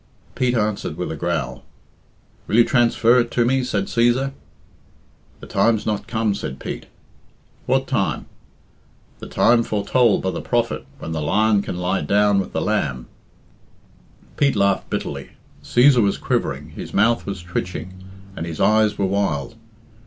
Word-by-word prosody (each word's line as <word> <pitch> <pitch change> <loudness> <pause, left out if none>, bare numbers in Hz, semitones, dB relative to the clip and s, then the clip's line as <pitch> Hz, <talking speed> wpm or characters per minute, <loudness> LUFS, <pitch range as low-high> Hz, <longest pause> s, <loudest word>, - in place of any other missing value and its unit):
Pete 125 -1 0
answered 105 -2 -1
with - - -3
a - - -4
growl. 65 0 -3 0.8
"Will - - -1
you 120 - +7
transfer 120 -1 +3
it 120 -1 0
to 120 0 +1
me?" 130 +1 +2
said 100 -5 -1
Cæsar. 120 +5 +1 1.1
"The - - -9
time's 110 -2 +1
not 105 -2 -2
come," 110 -2 0
said 65 -8 -5
Pete. - - -6 0.8
"What - - +2
time?" - - -1 0.9
"The - - -8
time 115 +1 +3
foretold 110 +1 +2
by 95 - 0
the - - -5
prophet, 120 -1 -1
when 80 - -7
the 80 -1 -2
lion 105 +6 +2
can 90 - -5
lie 90 +2 -1
down 105 0 +3
with 95 - -3
the - - -2
lamb." 65 -1 -1 1.3
Pete 140 -3 +2
laughed 100 -1 +1
bitterly. - - -4 0.3
Cæsar 125 0 +5
was 100 -2 +1
quivering, 70 +3 -2
his - - -8
mouth 115 +3 +2
was 100 -3 -5
twitching, 90 +1 -5 0.3
and 80 - -5
his 80 -2 -6
eyes 105 +1 +3
were 100 - +1
wild. 95 -6 -1
105 Hz, 155 wpm, -21 LUFS, 95-120 Hz, 1.3 s, you